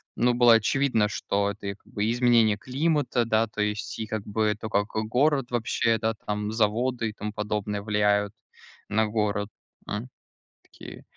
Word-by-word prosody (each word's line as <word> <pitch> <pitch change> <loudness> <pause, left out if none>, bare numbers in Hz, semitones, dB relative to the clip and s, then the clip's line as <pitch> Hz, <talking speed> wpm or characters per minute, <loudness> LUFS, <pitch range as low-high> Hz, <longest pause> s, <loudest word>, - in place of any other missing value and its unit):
ну, 120 +1 +2
было 120 -1 +6
очевидно, 115 0 +2
что 100 -1 -1
это, 100 - -8
и 100 - -3
как - - -34
бы, 105 - -1
и 115 - +1
изменения 120 -3 +3
климата, 140 -2 0
да, 115 0 +2
то 105 0 -4
есть, 105 +1 -3
и 110 - -3
как 110 -2 -3
бы, 105 +1 0
и - - -2
то, 110 +2 -7
как 105 -1 +1
город 125 +5 0
вообще, 115 -1 +1
да, 110 0 -1
там 105 0 -2
и - - -3
заводы, 115 +2 0
и - - -8
тому 105 0 -5
подобное 105 -1 -3
влияют 105 -1 +1 0.6
на 110 +1 +2
город, 105 -1 -1 0.4
хм, 105 +4 -4 0.6
такие. - - -12
110 Hz, 185 wpm, -26 LUFS, 105-120 Hz, 0.6 s, было